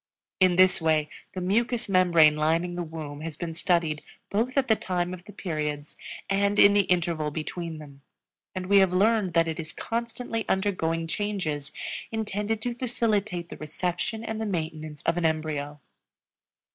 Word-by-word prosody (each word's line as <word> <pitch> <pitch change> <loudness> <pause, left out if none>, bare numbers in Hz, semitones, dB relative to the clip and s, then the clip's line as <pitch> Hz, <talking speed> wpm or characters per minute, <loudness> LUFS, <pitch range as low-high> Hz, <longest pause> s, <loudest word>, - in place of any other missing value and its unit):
In 185 -2 +5
this 185 -1 +5
way 155 -2 +2 0.2
the 185 - -4
mucous 230 +6 +1
membrane 170 -5 +5
lining 165 +3 +1
the 175 - -3
womb 155 -3 -6
has 160 -2 -6
been 170 -2 -4
studied 165 -2 +1 0.3
both 235 +6 0
at 270 -1 +3
the 220 - +5
time 180 -3 -2
of 180 -1 -8
the 210 - -10
periods 150 -6 -4 0.3
and 200 +1 +1
in 200 -1 +8
the 205 -1 +4
interval 170 -4 +1
between 160 +2 -5
them, 140 -2 -12 0.5
and 185 -1 -3
we 200 +2 +5
have 190 -2 +5
learned 200 -2 +2
that 165 0 +4
it 160 +1 -3
is 155 -1 -5
constantly 230 +1 -3
undergoing 165 -4 0
changes 165 -6 -3 0.4
intended 215 0 -2
to 245 - -1
facilitate 215 -7 -1
the - - -8
reception 180 +8 -3
and 225 -1 -4
the 220 - -1
maintenance 155 -4 -4
of 165 - +1
an 175 - +1
embryo. 150 -2 -2
175 Hz, 165 wpm, -27 LUFS, 160-205 Hz, 0.5 s, in